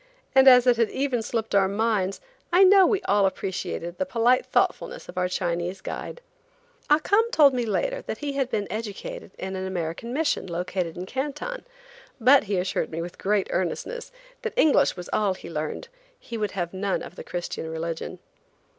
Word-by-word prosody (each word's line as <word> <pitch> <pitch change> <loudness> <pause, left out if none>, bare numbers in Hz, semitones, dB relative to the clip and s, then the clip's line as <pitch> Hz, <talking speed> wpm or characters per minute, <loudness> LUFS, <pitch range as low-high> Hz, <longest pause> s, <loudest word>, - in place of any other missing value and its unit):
and 265 0 +6
as 250 -1 +8
it 245 -2 +4
had 230 -2 +2
even 265 -3 -1
slipped 225 0 -3
our 195 -1 +4
minds, 200 -2 0 0.3
I 360 +3 +6
know 385 -1 +7
we 400 -2 +1
all 200 -1 +3
appreciated 180 -2 -4
the 280 - +1
polite 245 0 +2
thoughtfulness - - 0
of - - -10
our 180 0 0
Chinese 175 +1 -2
guide. - - -6 0.7
Ah 295 - +7
Cum 410 +8 +2
told 295 - +5
me 245 -2 -1
later - - -1
that - - -5
he 290 -1 -3
had 270 -2 -1
been 215 -4 -1
educated 215 -2 -6
in 190 0 -5
an 190 0 -3
American 175 +5 -4
mission 290 -6 0
located 175 -1 -3
in 180 - -4
Canton, 295 - -4 0.5
but 255 +1 +6
he 200 -1 -1
assured 180 +1 -1
me, 160 - -5
with 170 +1 -6
great 200 0 +1
earnestness, 470 - -3 0.3
that 455 0 -5
English 315 - +4
was 180 - -7
all 200 -3 +2
he 170 - -10
learned. 155 - -4 0.3
He 235 - -8
would 210 -3 -2
have 175 -2 -3
none 195 +1 -1
of - - -10
the - - -8
Christian 175 -2 -5
religion. 165 +2 -4
210 Hz, 185 wpm, -25 LUFS, 185-275 Hz, 0.7 s, as